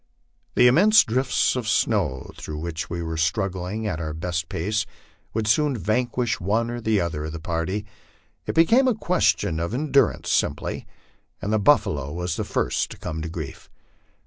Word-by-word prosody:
The - - +5
immense 205 - +6
drifts 125 +3 +1
of 125 -3 -3
snow 95 - 0
through 75 - -7
which 80 +1 -4
we 85 -1 -3
were 80 0 -4
struggling 95 +4 -1
at 90 -7 -2
our 80 -2 -4
best 80 -1 -3
pace 105 +6 -1 0.5
would 110 -1 0
soon 135 +5 +2
vanquish 120 +4 0
one 110 +6 0
or 120 0 -5
the 110 -2 +2
other 80 -4 -2
of 80 - -5
the 85 - -5
party; 85 +5 -2 0.6
it - - -2
became 230 +12 +5
a 250 - +3
question 170 - +1
of 85 +7 -2
endurance 140 0 +2
simply, - - -1 0.5
and 105 +1 -2
the 110 - +3
buffalo 75 - +2
was 90 +1 -3
the - - -2
first - - -1
to - - -10
come 80 -2 -5
to 80 - -4
grief. 80 -5 -7
100 Hz, 170 wpm, -24 LUFS, 80-120 Hz, 0.6 s, immense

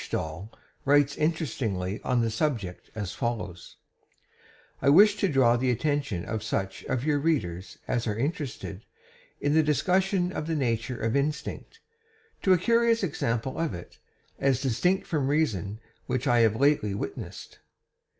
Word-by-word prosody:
Dall 80 +7 -4 0.3
writes 140 0 +4
interestingly 115 - -1
on 125 -2 +1
this 115 -1 0
subject 110 - -2
as 105 -4 -4
follows: 105 -8 -4 1.0
"I 140 - +4
wish 205 +8 +7
to 200 - +2
draw 125 -4 +4
the 130 +1 0
attention 125 - -1
of 110 -1 -3
such 95 -3 -3
of 125 - -1
your 150 -1 +2
readers 100 - -1
as 120 0 -1
are 105 -1 -1
interested 135 - -3 0.6
in 145 0 +1
the 160 - +5
discussion 180 - +1
of 155 -3 -4
the 165 - 0
nature 120 -3 -1
of 115 +2 0
instinct, 150 - -3 0.6
to 190 - +3
a 185 - +7
curious 230 +3 +3
example 130 -6 -1
of 165 - -1
it, 85 - -11 0.4
as 135 -2 +2
distinct 160 - +1
from 150 -7 -1
reason, 110 - 0 0.3
which 130 0 -1
I 120 - +4
have 110 -2 +4
lately 135 -6 +2
witnessed. - - -7
130 Hz, 150 wpm, -27 LUFS, 110-155 Hz, 1.0 s, wish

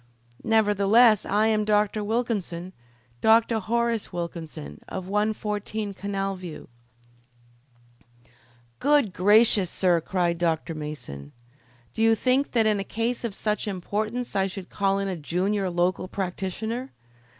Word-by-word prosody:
"Nevertheless 215 0 +4
I 210 +2 +2
am 215 -1 +2
Dr. 210 0 +1
Wilkinson 205 -6 -2 0.5
Dr. 225 0 +4
Horace 230 +1 -1
Wilkinson, 165 - -6
of 185 -1 -5
114 210 0 -2
Canal 195 0 -3
View." 175 -4 -9 2.1
"Good 285 -8 +3
gracious, 205 -1 +4
Sir 175 -2 +2
John!" - - -27
cried 175 -2 +1
Dr. 165 -1 0
Mason. 145 - -7 0.6
"Did - - -3
you 225 0 +5
think 255 +5 +1
that 230 -3 +3
in 210 -2 +2
a - - -2
case 230 +5 -2
of 225 -4 -3
such 210 0 -1
importance 215 +5 -3
I 195 -1 +2
should 190 -1 -8
call 195 -1 +1
in 195 0 -1
a 190 - -2
junior 185 +5 -1
local 175 +1 0
practitioner! 200 +7 -4
205 Hz, 130 wpm, -25 LUFS, 180-220 Hz, 2.1 s, you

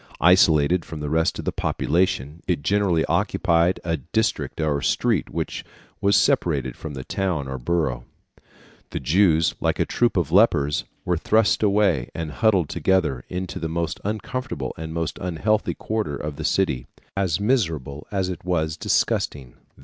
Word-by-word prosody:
Isolated 85 -1 +5
from 80 -1 -8
the 75 -1 -4
rest 80 +1 +1
of - - -6
the - - 0
population, 85 -3 -1
it 85 -6 0
generally 100 -4 +2
occupied 85 -1 +1
a 85 -1 -1
district 105 - -2
or 75 -3 0
street - - +1
which - - -4 0.4
was 100 0 +3
separated 70 -7 +1
from 75 -3 -7
the 65 - -6
town 90 -7 -2
or 65 0 -5
borough. 65 -4 -1 0.8
The - - -4
Jews, 80 +3 +3
like - - 0
a - - +3
troop 120 -4 +1
of 85 -4 0
lepers, 80 -8 +3 0.2
were 90 -1 +1
thrust 110 +5 +2
away 100 - +2
and 80 -2 -4
huddled 95 -4 +2
together 75 -10 +1
into 90 0 -4
the 80 - -3
most 85 +1 -2
uncomfortable 110 - -4
and 80 0 -6
most 80 -2 -3
unhealthy 95 +5 0
quarter 110 -10 -2
of 75 0 -5
the - - -4
city, 60 -1 0 0.3
as 95 -4 0
miserable 80 - -1
as 95 -2 -1
it 90 -2 -5
vas 80 -3 -1
disgusting. 65 -5 0
85 Hz, 155 wpm, -23 LUFS, 75-95 Hz, 0.8 s, Isolated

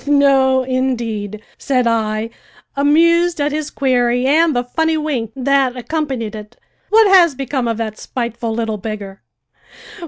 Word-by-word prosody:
"No, 270 -2 +3
indeed," 235 -5 -3 0.2
said 255 -3 0
I, 220 -1 -1 0.4
amused 335 +4 +3
at 290 +1 0
his 305 0 -3
query 245 -2 +1
and 310 +2 +3
the 245 - +1
funny 320 +6 -1
wink 275 -8 -3
that 270 -1 +1
accompanied 255 -4 -3
it. 210 -1 -10 0.3
"What 440 +1 +5
has 350 -6 +5
become 265 -2 -3
of 230 -1 -2
that 220 -2 -5
spiteful 235 -2 -4
little 220 -1 -2
beggar?" 200 -2 -7
255 Hz, 135 wpm, -17 LUFS, 230-290 Hz, 0.4 s, What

